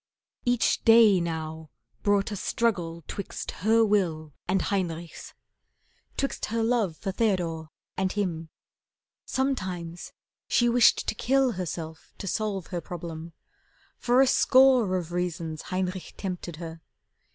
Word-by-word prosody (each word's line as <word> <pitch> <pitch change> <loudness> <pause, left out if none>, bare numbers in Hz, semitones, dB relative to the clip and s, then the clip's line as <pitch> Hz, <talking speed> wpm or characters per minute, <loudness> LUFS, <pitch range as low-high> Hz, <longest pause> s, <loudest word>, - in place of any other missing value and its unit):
Each 245 -1 +2
day 225 -4 +7
now 160 -2 -4 0.3
brought 205 0 +2
a - - -2
struggle 175 -6 -1
'twixt 200 - -5
her 225 +1 +5
will 165 -8 0
And 190 +2 +2
Heinrich's. 170 -4 -3 0.8
'Twixt 275 - -1
her 225 +1 -1
love 225 -8 +1
for 195 - -3
Theodore 175 -7 -1 0.3
And 190 0 0
him. 170 -6 -2 0.8
Sometimes 185 -11 -3 0.4
she 240 - +3
wished 240 0 +4
to - - +1
kill 265 +3 +2
Herself 165 -4 -6
to - - -7
solve 195 -2 -2
her 175 - -1
problem. 165 -1 -7 0.7
For 245 +2 +4
a - - +6
score 255 -7 +5
Of 175 -2 -5
reasons 170 -3 -3
Heinrich 185 0 -3
tempted 180 -3 -5
her. 165 0 -8
185 Hz, 125 wpm, -27 LUFS, 165-225 Hz, 0.8 s, day